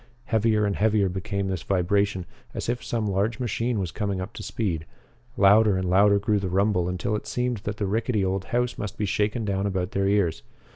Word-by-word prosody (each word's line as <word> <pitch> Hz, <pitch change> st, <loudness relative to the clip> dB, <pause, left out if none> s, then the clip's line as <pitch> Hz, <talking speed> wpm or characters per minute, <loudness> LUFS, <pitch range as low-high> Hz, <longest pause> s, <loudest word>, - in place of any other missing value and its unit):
Heavier 110 Hz, -3 st, +2 dB
and 100 Hz, -1 st, 0 dB
heavier 105 Hz, -2 st, +3 dB
became 100 Hz, +1 st, -3 dB
this 95 Hz, -3 st, -2 dB
vibration, 95 Hz, +1 st, +1 dB, 0.3 s
as -, -, -3 dB
if 120 Hz, 0 st, -2 dB
some 115 Hz, -2 st, -2 dB
large 105 Hz, +4 st, 0 dB
machine 120 Hz, 0 st, -1 dB
was 95 Hz, -4 st, -2 dB
coming 100 Hz, -3 st, -2 dB
up 95 Hz, +2 st, -5 dB
to -, -, -8 dB
speed. 85 Hz, -8 st, -3 dB, 0.5 s
Louder 100 Hz, 0 st, +5 dB
and 95 Hz, 0 st, -1 dB
louder 100 Hz, +3 st, +5 dB
grew 105 Hz, +1 st, +1 dB
the 95 Hz, -2 st, -3 dB
rumble 95 Hz, -1 st, +1 dB
until 90 Hz, +4 st, -1 dB
it 105 Hz, -, -5 dB
seemed 125 Hz, -1 st, -1 dB
that 105 Hz, +1 st, -3 dB
the 105 Hz, -, -1 dB
rickety 110 Hz, 0 st, 0 dB
old 95 Hz, 0 st, -1 dB
house 125 Hz, -1 st, -1 dB
must 105 Hz, -1 st, -5 dB
be 105 Hz, -, -1 dB
shaken 105 Hz, +3 st, 0 dB
down 100 Hz, 0 st, 0 dB
about 95 Hz, 0 st, -2 dB
their 100 Hz, -3 st, 0 dB
ears. 100 Hz, -9 st, +1 dB
100 Hz, 205 wpm, -25 LUFS, 95-110 Hz, 0.5 s, Louder